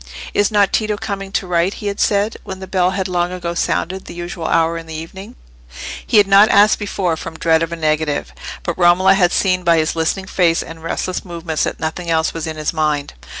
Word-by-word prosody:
"Is 205 Hz, -, +2 dB
not 205 Hz, -2 st, +2 dB
Tito 215 Hz, -1 st, 0 dB
coming 200 Hz, -3 st, -5 dB
to 195 Hz, -, 0 dB
write?" 180 Hz, +2 st, 0 dB
he -, -, -9 dB
had 200 Hz, 0 st, -3 dB
said, 205 Hz, +2 st, +1 dB
when 190 Hz, -2 st, -7 dB
the 190 Hz, -, -7 dB
bell 185 Hz, -1 st, +1 dB
had 190 Hz, 0 st, -2 dB
long 175 Hz, -1 st, -1 dB
ago 175 Hz, -2 st, -4 dB
sounded 185 Hz, +2 st, -2 dB
the -, -, -9 dB
usual 175 Hz, -1 st, -5 dB
hour 165 Hz, 0 st, +2 dB
in 165 Hz, -1 st, -7 dB
the 160 Hz, -, -7 dB
evening. 165 Hz, +5 st, -9 dB, 0.7 s
He 225 Hz, -, +3 dB
had 205 Hz, -, +7 dB
not 200 Hz, +2 st, +6 dB
asked 205 Hz, +1 st, +5 dB
before, 195 Hz, -5 st, -1 dB
from 160 Hz, 0 st, -8 dB
dread 160 Hz, 0 st, +2 dB
of 165 Hz, 0 st, -2 dB
a -, -, -2 dB
negative; 155 Hz, -2 st, -1 dB, 0.3 s
but 170 Hz, +1 st, -3 dB
Romola 180 Hz, +2 st, +5 dB
had 180 Hz, -3 st, +3 dB
seen 185 Hz, -2 st, +1 dB
by 170 Hz, -1 st, +4 dB
his 155 Hz, 0 st, 0 dB
listening 165 Hz, +4 st, -1 dB
face 175 Hz, -3 st, +1 dB
and 165 Hz, 0 st, -11 dB
restless 180 Hz, +2 st, -3 dB
movements 170 Hz, -3 st, -3 dB
that -, -, -4 dB
nothing 170 Hz, +2 st, -4 dB
else 160 Hz, -1 st, +1 dB
was 165 Hz, -1 st, -4 dB
in 160 Hz, -1 st, -5 dB
his 155 Hz, +1 st, -2 dB
mind. 150 Hz, -, -1 dB
175 Hz, 225 wpm, -18 LUFS, 165-195 Hz, 0.7 s, had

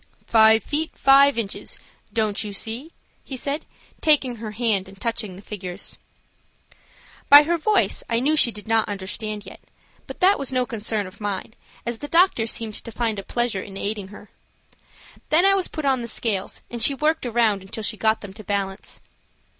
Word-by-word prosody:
"Five 220 Hz, 0 st, +5 dB
feet 315 Hz, +2 st, -2 dB
five 275 Hz, 0 st, +6 dB
inches; 210 Hz, -4 st, -4 dB, 0.3 s
don't 215 Hz, -2 st, 0 dB
you 205 Hz, -1 st, -6 dB
see?" 230 Hz, +10 st, -2 dB, 0.3 s
he 265 Hz, -, -7 dB
said, 285 Hz, +4 st, -3 dB, 0.3 s
taking 270 Hz, -6 st, +2 dB
her 220 Hz, 0 st, -6 dB
hand 210 Hz, -3 st, 0 dB
and 195 Hz, 0 st, -15 dB
touching 220 Hz, -5 st, -2 dB
the 195 Hz, -, -13 dB
figures. 190 Hz, -2 st, -5 dB, 1.3 s
By 285 Hz, +1 st, +10 dB
her 340 Hz, +3 st, +1 dB
voice 415 Hz, +6 st, +1 dB
I 230 Hz, -1 st, +1 dB
knew 295 Hz, +5 st, +2 dB
she 300 Hz, -, +5 dB
did 210 Hz, -1 st, -9 dB
not 225 Hz, -1 st, +2 dB
understand 205 Hz, +1 st, -4 dB
yet, -, -, -11 dB, 0.5 s
but -, -, -9 dB
that 385 Hz, +2 st, +4 dB
was 275 Hz, -2 st, -2 dB
no 255 Hz, -1 st, +1 dB
concern 220 Hz, -3 st, -1 dB
of 185 Hz, +3 st, -12 dB
mine, 205 Hz, +1 st, -4 dB, 0.3 s
as 235 Hz, -1 st, -3 dB
the 290 Hz, -, -6 dB
doctor 330 Hz, -8 st, +3 dB
seemed 225 Hz, -1 st, -2 dB
to 230 Hz, -, -8 dB
find 225 Hz, -2 st, -2 dB
a -, -, -6 dB
pleasure 240 Hz, -3 st, -1 dB
in 195 Hz, 0 st, -9 dB
aiding 205 Hz, -1 st, -3 dB
her. 205 Hz, +1 st, -14 dB, 1.0 s
Then 330 Hz, +4 st, +4 dB
I 390 Hz, -, +6 dB
was 385 Hz, -2 st, +1 dB
put 310 Hz, -2 st, -5 dB
on 265 Hz, -2 st, +2 dB
the 235 Hz, -, -5 dB
scales, 215 Hz, -4 st, -2 dB
and 240 Hz, -1 st, -5 dB
she 275 Hz, +5 st, +5 dB
worked 305 Hz, -1 st, 0 dB
around 225 Hz, -4 st, +2 dB
until 195 Hz, +3 st, -7 dB
she 215 Hz, -, -1 dB
got 220 Hz, +1 st, +1 dB
them 200 Hz, -2 st, -9 dB
to 215 Hz, +1 st, -11 dB
balance. 195 Hz, -1 st, -4 dB
225 Hz, 185 wpm, -23 LUFS, 205-270 Hz, 1.3 s, By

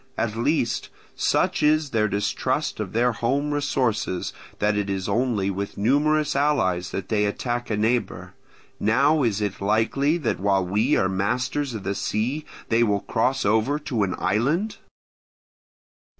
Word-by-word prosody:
At 110 Hz, -2 st, -1 dB
least, 120 Hz, -2 st, 0 dB, 0.3 s
such -, -, +1 dB
is 150 Hz, -1 st, +2 dB
their 110 Hz, -2 st, +2 dB
distrust 100 Hz, 0 st, -1 dB
of -, -, -4 dB
their 120 Hz, +2 st, +2 dB
home 135 Hz, +6 st, -1 dB
resources 125 Hz, -10 st, -1 dB, 0.2 s
that 105 Hz, 0 st, +1 dB
it 100 Hz, -1 st, -1 dB
is 95 Hz, -1 st, -2 dB
only 105 Hz, -2 st, 0 dB
with 100 Hz, +1 st, -5 dB
numerous 145 Hz, +7 st, +2 dB
allies 110 Hz, -11 st, +1 dB
that 95 Hz, -, -5 dB
they 105 Hz, -2 st, +2 dB
attack 120 Hz, +3 st, -2 dB
a 105 Hz, -, 0 dB
neighbour; 110 Hz, 0 st, -1 dB, 0.5 s
now 140 Hz, +8 st, +3 dB
is 110 Hz, -5 st, 0 dB
it 100 Hz, -2 st, -3 dB
likely 115 Hz, +9 st, +1 dB
that 150 Hz, -9 st, -2 dB
while 95 Hz, -1 st, +2 dB
we 100 Hz, +4 st, +2 dB
are 95 Hz, -, +2 dB
masters 125 Hz, +8 st, -1 dB
of 105 Hz, -, -6 dB
the 100 Hz, -, -1 dB
sea 120 Hz, +10 st, -2 dB, 0.2 s
they 115 Hz, +1 st, +3 dB
will 105 Hz, -3 st, +2 dB
cross 125 Hz, +2 st, 0 dB
over 110 Hz, +7 st, +2 dB
to 130 Hz, -7 st, -3 dB
an 95 Hz, -3 st, 0 dB
island? 140 Hz, -, 0 dB
115 Hz, 150 wpm, -24 LUFS, 100-140 Hz, 0.5 s, now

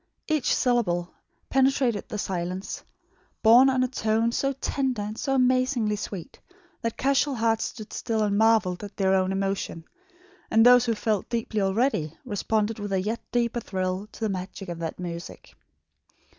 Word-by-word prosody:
Each 310 Hz, -4 st, +1 dB
syllable 180 Hz, -9 st, +1 dB, 0.4 s
penetrated 265 Hz, -5 st, +2 dB
the 210 Hz, -, -4 dB
silence, 185 Hz, -1 st, -4 dB, 0.6 s
borne 240 Hz, +4 st, +7 dB
on 260 Hz, -1 st, +2 dB
a -, -, +1 dB
tone 225 Hz, -2 st, 0 dB
so 275 Hz, +3 st, 0 dB
tender 265 Hz, -4 st, -2 dB
and 210 Hz, +1 st, -5 dB
so 270 Hz, +4 st, -1 dB
amazingly 255 Hz, -4 st, +2 dB
sweet, 200 Hz, -4 st, -7 dB, 0.4 s
that 230 Hz, -1 st, -3 dB
casual 275 Hz, +1 st, +2 dB
hearts 225 Hz, -1 st, +1 dB
stood 215 Hz, -2 st, -8 dB
still 225 Hz, -3 st, -1 dB
and 205 Hz, -1 st, +1 dB
marvelled 215 Hz, -4 st, +3 dB
at 205 Hz, 0 st, -9 dB
their 190 Hz, -1 st, +2 dB
own 190 Hz, 0 st, +2 dB
emotion; 195 Hz, -4 st, -2 dB, 0.6 s
and 225 Hz, +1 st, +5 dB
those 245 Hz, 0 st, +7 dB
who 230 Hz, -2 st, +1 dB
felt 210 Hz, -2 st, -1 dB
deeply 230 Hz, -2 st, -1 dB
already, 195 Hz, -, 0 dB
responded 215 Hz, 0 st, -1 dB
with 205 Hz, -1 st, -5 dB
a 190 Hz, -, +2 dB
yet 215 Hz, +5 st, -2 dB
deeper 240 Hz, 0 st, 0 dB
thrill 185 Hz, -1 st, -3 dB
to -, -, -12 dB
the 220 Hz, -, 0 dB
magic 190 Hz, 0 st, -5 dB
of 170 Hz, -1 st, -5 dB
that 165 Hz, -1 st, -4 dB
music. 170 Hz, -1 st, -7 dB
220 Hz, 160 wpm, -26 LUFS, 195-245 Hz, 0.6 s, borne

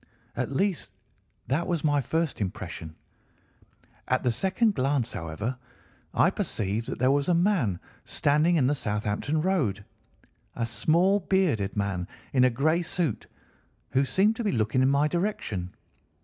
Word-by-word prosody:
At -, -, -2 dB
least 190 Hz, +5 st, 0 dB, 0.6 s
that 155 Hz, +6 st, -1 dB
was 170 Hz, -4 st, -1 dB
my 145 Hz, -2 st, +2 dB
first 160 Hz, 0 st, -1 dB
impression. 80 Hz, -4 st, -5 dB, 1.1 s
At 130 Hz, -, +1 dB
the 125 Hz, -, +2 dB
second 190 Hz, -, +1 dB
glance, 130 Hz, -, 0 dB
however, 95 Hz, +10 st, -4 dB, 0.5 s
I -, -, +3 dB
perceived 105 Hz, +3 st, -2 dB
that -, -, -4 dB
there 130 Hz, +2 st, +3 dB
was 140 Hz, +3 st, +1 dB
a 175 Hz, -, +4 dB
man 170 Hz, -, +1 dB, 0.2 s
standing 150 Hz, +4 st, +2 dB
in 145 Hz, -6 st, +3 dB
the 140 Hz, -, +3 dB
Southampton 105 Hz, +5 st, -1 dB
Road, 135 Hz, -, 0 dB, 0.7 s
a 115 Hz, -, -1 dB
small 165 Hz, -, +3 dB
bearded 165 Hz, -, 0 dB
man 95 Hz, -3 st, -1 dB, 0.3 s
in 130 Hz, -2 st, +4 dB
a 130 Hz, -, +6 dB
grey 155 Hz, +8 st, +1 dB
suit, 170 Hz, -, -2 dB, 0.6 s
who 135 Hz, -, +3 dB
seemed 200 Hz, +10 st, +2 dB
to 240 Hz, -, -2 dB
be 210 Hz, -, +1 dB
looking 115 Hz, +2 st, +1 dB
in 130 Hz, -, +4 dB
my 140 Hz, +2 st, +3 dB
direction. 150 Hz, -, -2 dB
140 Hz, 150 wpm, -27 LUFS, 110-170 Hz, 1.1 s, a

